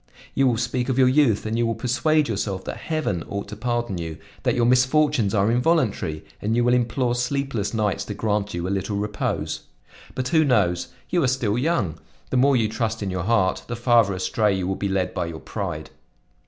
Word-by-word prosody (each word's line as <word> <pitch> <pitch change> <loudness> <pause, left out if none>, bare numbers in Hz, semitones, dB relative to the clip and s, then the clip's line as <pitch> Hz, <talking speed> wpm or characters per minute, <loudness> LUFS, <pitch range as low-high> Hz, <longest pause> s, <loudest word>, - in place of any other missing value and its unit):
You 135 -1 +3
will 120 -3 +2
speak 120 +2 -1
of 130 - 0
your 130 -1 +6
youth 130 -6 +3
and 110 +1 -1
you 120 - +2
will 115 - -1
persuade 145 +7 +1
yourself 100 -3 -2
that - - -5
Heaven 155 - -2
ought 100 0 -4
to 105 - -6
pardon 120 -4 -2
you, 80 -2 -5 0.2
that - - +1
your 120 -1 +2
misfortunes 125 -3 +3
are 100 +2 +3
involuntary 125 - +1 0.2
and 110 +2 0
you 120 - +3
will 120 +1 +3
implore 120 0 +1
sleepless 125 -3 -1
nights 105 -3 0
to 105 - -5
grant 105 -1 -1
you 85 +1 -2
a - - -2
little 100 +1 -2
repose. 105 0 -2 0.6
"But 130 0 -2
who 160 +1 +4
knows? 95 - +2 0.2
You 175 - +2
are 135 - +3
still 125 -5 0
young. 125 - 0 0.3
The 130 - +2
more 135 +1 +4
you 110 -2 +2
trust 110 0 -2
in 95 - -2
your 90 -2 -3
heart, 105 -4 +1
the 120 - -3
farther 115 -4 +3
astray 100 +2 +1
you 95 - -2
will 95 - 0
be 100 +1 -2
lead 95 -1 0
by 85 - -2
your 80 -1 -6
pride. - - -5
115 Hz, 210 wpm, -23 LUFS, 100-125 Hz, 0.6 s, your